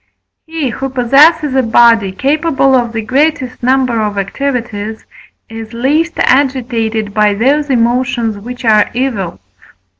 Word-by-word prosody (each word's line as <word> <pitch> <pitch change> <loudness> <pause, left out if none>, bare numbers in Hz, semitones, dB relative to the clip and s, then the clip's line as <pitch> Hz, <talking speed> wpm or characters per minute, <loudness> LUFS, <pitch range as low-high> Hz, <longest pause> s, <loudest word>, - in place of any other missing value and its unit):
He, 320 -4 -3
who 270 +3 -4
possesses 275 +4 +3
a 265 - +2
body 230 -4 +3
capable 275 - 0
of 240 -3 +1
the 225 -1 -4
greatest 260 +1 -1
number 250 -2 +1
of 210 -1 -3
activities, 220 -1 -4 0.4
is 225 0 -9
least 300 +8 0
agitated 235 -6 0
by 210 -1 +2
those 280 +7 +1
emotions 240 -2 0
which 245 +4 -8
are 215 -2 +3
evil 230 -9 -2
(IV. - - -23
245 Hz, 130 wpm, -13 LUFS, 225-270 Hz, 0.4 s, possesses